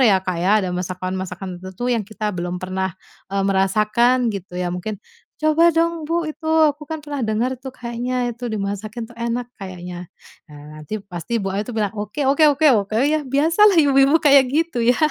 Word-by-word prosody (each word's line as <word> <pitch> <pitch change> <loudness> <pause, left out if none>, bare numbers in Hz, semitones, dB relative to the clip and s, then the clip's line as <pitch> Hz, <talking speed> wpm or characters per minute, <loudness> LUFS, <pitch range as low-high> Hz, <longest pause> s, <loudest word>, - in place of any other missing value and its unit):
ya 210 -7 +5
Kak 185 -2 -2
ya. 185 - +2
Ada - - -2
masakan-masakan 185 0 -4
tertentu 190 +5 -7
yang 230 - +1
kita 215 0 -4
belum 175 +1 -3
pernah, 190 0 -2 0.4
eee, 195 0 +1
merasakan 215 +6 +2
gitu 185 -2 -7
ya, 180 - -1
mungkin 190 +4 -4 0.4
"Coba 315 +2 +4
dong 330 0 0
bu 335 0 0
itu 315 +1 -6 0.2
aku 295 +1 -5
kan 320 0 -4
pernah 290 -2 -4
dengar 225 +4 0
tuh 265 0 -7
kayaknya 245 +1 -2
itu, 245 +2 -10
dimasakin 210 +2 -4
tuh 240 - -16
enak 235 +1 -2
kayaknya." 180 -2 -7 0.4
Nah 150 +1 -11
nanti 210 +8 -5 0.2
pasti 175 +8 -3
bu 195 - -2
A 200 - -1
itu 245 - -7
bilang, 205 -2 0
"Oke 240 +8 -3
oke 285 +3 +4
oke 295 +2 +2
oke," 205 +1 -1
ya 310 0 +1
biasalah 335 +9 +4
ibu-ibu 275 +1 +5
kayak 280 -2 +7
gitu 320 -5 0
ya. 245 +1 +4
225 Hz, 185 wpm, -21 LUFS, 190-280 Hz, 0.4 s, kayak